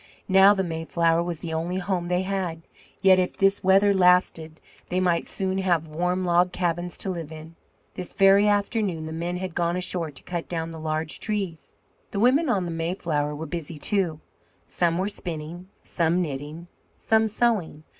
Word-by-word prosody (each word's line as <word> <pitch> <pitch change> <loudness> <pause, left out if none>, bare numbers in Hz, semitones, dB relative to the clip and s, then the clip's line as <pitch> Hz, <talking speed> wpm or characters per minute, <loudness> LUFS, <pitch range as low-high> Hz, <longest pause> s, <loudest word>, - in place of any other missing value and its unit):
Now 195 +2 +6
the 190 - 0
Mayflower 165 0 0
was 170 -2 -4
the 165 -2 -5
only 170 +3 -2
home 180 -2 -2
they 180 +1 0
had; 185 -4 -3 0.4
yet 190 -1 +6
if 180 - -1
this 195 +1 +2
weather 195 +2 +5
lasted 180 -4 +2 0.3
they 180 - 0
might 175 -2 +1
soon 190 0 -2
have 175 -4 +1
warm 180 +4 -1
log 175 +1 +3
cabins 175 -1 -2
to 190 - -3
live 165 -4 -6
in. 160 +1 -10 0.4
This 180 - -6
very 195 +1 +5
afternoon 205 -5 0
the 160 - -6
men 170 +2 -3
had 185 -1 -5
gone 170 +1 0
ashore 180 -2 -1
to 140 - -12
cut 175 -2 -5
down 165 -1 -3
the 160 - -8
large 155 0 -3
trees. 195 -7 -4 0.3
The 200 - -4
women 265 +7 +3
of 195 -6 +1
the 170 - -4
Mayflower 165 -3 -2
were 155 +2 -5
busy, 165 0 -6
too. 175 -2 -1 0.5
Some 170 -1 0
were 190 +2 0
spinning, 175 -2 -5
some 170 0 0
knitting, 150 +1 -5 0.3
some 220 0 +2
sewing. 210 -9 0
175 Hz, 175 wpm, -25 LUFS, 165-190 Hz, 0.5 s, Now